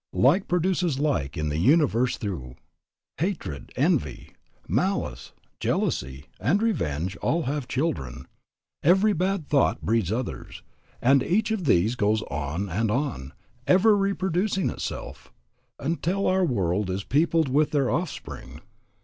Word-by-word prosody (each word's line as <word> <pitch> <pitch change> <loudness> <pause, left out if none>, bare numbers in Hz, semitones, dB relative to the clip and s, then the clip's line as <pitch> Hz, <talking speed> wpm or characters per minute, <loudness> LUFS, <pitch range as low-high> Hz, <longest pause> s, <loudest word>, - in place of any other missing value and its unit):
"Like 160 +11 +3
produces 180 -3 +1
like 135 - 0
the 75 0 -2
universe 130 - +3
through. 75 - -5 0.6
Hatred, 165 - -3
envy, - - 0 0.4
malice, 100 - -1 0.3
jealousy, 65 +2 -1
and 175 +10 +2
revenge 95 - -1
all 165 +2 0
have 140 -1 -3
children. 70 - -2 0.6
Every 190 +6 +4
bad 185 -3 -1
thought 145 -2 +2
breeds 110 -4 +1
others, 120 +3 -5 0.4
and 135 +2 +5
each 210 - +1
of 210 -6 -1
these 105 -1 +3
goes 110 -2 +1
on 75 +7 -3
and 105 +5 -1
on, 115 - -2 0.3
ever 205 +4 +5
reproducing 195 -1 0
itself, - - -7 0.5
until 170 +6 -1
our 185 0 +3
world 100 - 0
is 95 +1 -2
peopled 160 +3 +2
with 145 +3 +3
their 140 -4 +1
offspring. 170 +2 -5
135 Hz, 125 wpm, -25 LUFS, -, 0.6 s, and